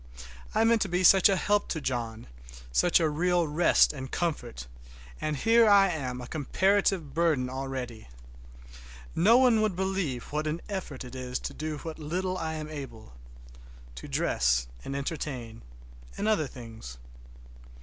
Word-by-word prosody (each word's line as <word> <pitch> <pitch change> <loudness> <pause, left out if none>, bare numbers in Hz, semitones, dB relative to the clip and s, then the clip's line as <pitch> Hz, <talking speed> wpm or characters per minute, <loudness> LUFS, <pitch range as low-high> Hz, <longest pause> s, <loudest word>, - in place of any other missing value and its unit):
I - - +4
meant 225 -1 +3
to 195 - 0
be 180 +1 0
such 195 +3 +7
a 195 - +3
help 205 +2 +1
to 160 - -3
John, 120 -5 -3 0.5
such 175 - +3
a 165 - +2
real 175 +2 +1
rest 155 +2 +4
and 130 -2 -7
comfort, 145 - -3 0.6
and 155 -1 -1
here 225 +6 +5
I 200 -1 +6
am 130 -6 -4
a 125 - -7
comparative 185 +1 +1
burden 150 -6 +1
already! 130 - -5 1.1
Nobody 230 +5 +5
would 215 -4 +1
believe 185 -10 -2
what 150 +1 -2
an 155 +2 -2
effort 185 -10 -5
it 125 - -10
is 125 -1 -4
to - - -5
do 155 0 -4
what 160 +2 -7
little 180 +5 -2
I 160 -3 -3
am 155 -1 -5
able—to - - -12
dress 60 0 +1 0.2
and 135 - -5
entertain, 135 -5 -5 0.6
and 210 - -2
order 210 -9 +2
things. 115 - -10
150 Hz, 150 wpm, -28 LUFS, 125-185 Hz, 1.1 s, such